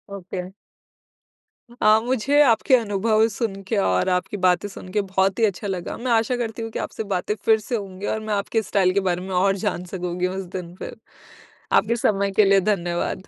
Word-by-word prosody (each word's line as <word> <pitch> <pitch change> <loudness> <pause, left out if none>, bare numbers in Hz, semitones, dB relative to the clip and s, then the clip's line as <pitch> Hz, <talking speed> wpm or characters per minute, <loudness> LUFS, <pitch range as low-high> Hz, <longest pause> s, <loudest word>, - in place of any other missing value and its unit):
Okay. 185 -1 -6 1.4
अ, 215 +1 +6
मुझे 260 +4 +2
आपके 255 +1 +4
अनुभव 220 0 +2
सुन 200 -3 -3
के 220 - -1
और 95 - +2
आपकी 180 +3 -1
बातें 180 +3 +3
सुन 185 - -10
के 210 - +3
बहुत 190 0 0
ही 225 - +5
अच्छा 205 +1 -2
लगा। 180 -3 -4
मैं 245 +1 -3
आशा 230 +2 +2
करती 230 -1 -4
हूँ 225 - -4
कि - - -4
आपसे 220 - -4
बातें 185 +3 0
फिर 220 -1 +5
से 235 +3 -4
होंगी 195 -1 -6
और - - -3
मैं 215 -1 -3
आपके 205 +2 0
स्टाइल 190 -2 +1
के 200 - +2
बारे 180 0 0
में 190 - -7
और 195 +2 +3
जान 180 -1 -2
सकूँगी 180 0 -2
उस 190 +1 -4
दिन 175 -1 -6
फिर, - - -8 0.8
आपके 235 +2 +3
समय 200 -3 +1
के 210 - +7
लिए 195 0 +5
धन्यवाद। 175 0 -2
200 Hz, 200 wpm, -23 LUFS, 185-220 Hz, 1.4 s, के